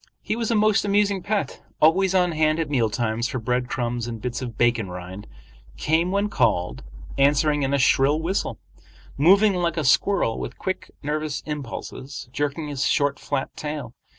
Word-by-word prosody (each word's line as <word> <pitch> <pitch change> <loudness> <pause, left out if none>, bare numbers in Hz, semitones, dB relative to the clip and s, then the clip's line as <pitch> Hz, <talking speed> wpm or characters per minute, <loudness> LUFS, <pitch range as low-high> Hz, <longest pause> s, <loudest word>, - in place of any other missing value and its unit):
He - - -1
was 230 -1 -2
a 230 - +2
most 215 0 +3
amusing 200 -1 +2
pet, 205 +2 -2 0.2
always 190 +4 +4
on 180 -1 +3
hand 155 -1 +2
at 160 -3 -2
meal 120 -6 +2
times 115 +1 -1
for 130 - -4
bread 125 +1 -1
crumbs 120 -1 -2
and 115 -2 -5
bits 125 +2 -4
of 120 -4 -6
bacon 115 -4 +2
rind, 90 +3 -8 0.5
came 165 +3 +1
when 200 +2 +1
called, 90 - 0 0.4
answering 145 +1 +3
in 135 -1 0
a 140 - +2
shrill 140 +2 +3
whistle, 175 +5 -2 0.6
moving 195 +8 +5
like 175 -2 -1
a 155 - 0
squirrel 135 - +2
with - - -6
quick, 190 -1 -4
nervous 150 0 -2
impulses, 140 -2 -6
jerking 145 +2 -2
his 140 -2 -2
short 145 -1 +1
flat 135 - -3
tail. 150 -5 -5
145 Hz, 175 wpm, -24 LUFS, 120-175 Hz, 0.6 s, moving